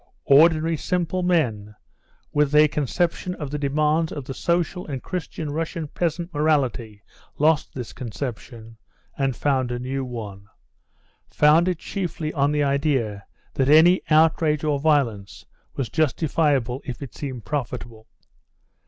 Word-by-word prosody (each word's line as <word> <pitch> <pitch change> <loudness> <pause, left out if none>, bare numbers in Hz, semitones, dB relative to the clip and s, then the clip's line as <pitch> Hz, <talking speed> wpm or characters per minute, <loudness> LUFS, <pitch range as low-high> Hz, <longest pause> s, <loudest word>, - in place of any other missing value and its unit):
Ordinary, 160 +3 +5
simple 180 +1 -1
men 115 - 0 0.6
with 150 0 +2
a 150 0 +7
conception 155 - -1
of 145 -3 -6
the 150 - -3
demands 150 +3 +1
of 145 -4 -6
the 135 - -5
social 175 +4 -1
and 135 -4 -5
Christian 160 -4 -5
Russian 160 +1 -3
peasant 170 +2 -3
morality 130 -9 0 0.3
lost 155 0 +2
this 125 -3 -6
conception, 115 -2 -7 0.4
and 135 -2 -1
found 130 -2 0
a 120 - -2
new 130 +2 -3
one, 105 -6 -7 0.8
founded 165 +4 +3
chiefly 170 -4 -4
on 145 -1 +1
the 150 0 +1
idea 140 -8 0 0.3
that 135 0 +1
any 165 +5 +6
outrage 155 -1 +3
or 150 -2 0
violence 135 -10 0 0.3
was 135 - -2
justifiable 145 -4 0
if 130 0 -6
it 135 - -9
seemed 130 -5 -6
profitable. 120 -5 -5
145 Hz, 130 wpm, -23 LUFS, 125-160 Hz, 0.8 s, a